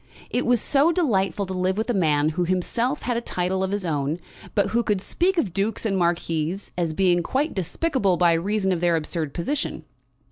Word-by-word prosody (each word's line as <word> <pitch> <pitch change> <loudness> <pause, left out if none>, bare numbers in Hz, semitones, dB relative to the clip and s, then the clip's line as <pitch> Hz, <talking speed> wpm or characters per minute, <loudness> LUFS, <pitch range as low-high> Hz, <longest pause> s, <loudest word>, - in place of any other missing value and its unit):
It 245 - 0
was 245 -1 +4
so 285 +8 +3
delightful 205 - +1
to 190 - -5
live 185 +1 0
with 220 - -1
a 245 - +1
man 155 -6 +2
who 175 +3 -1
himself 230 - -1
had 245 -2 0
a - - -1
title 185 -3 -1
of 190 - -1
his 200 -1 -2
own, 150 -1 -1 0.4
but 200 -2 +2
who 235 - +2
could 210 -4 0
speak 360 - 0
of 200 - 0
dukes 205 +5 -1
and 200 -3 +1
marquises 170 0 -1
as 170 -2 0
being 175 0 +3
quite 275 - -1
despicable 195 - 0
by 175 -1 +4
reason 190 +3 0
of 175 -2 -1
their 175 -1 +3
absurd 160 -1 -3
position. 275 - -2
190 Hz, 205 wpm, -24 LUFS, 170-230 Hz, 0.4 s, was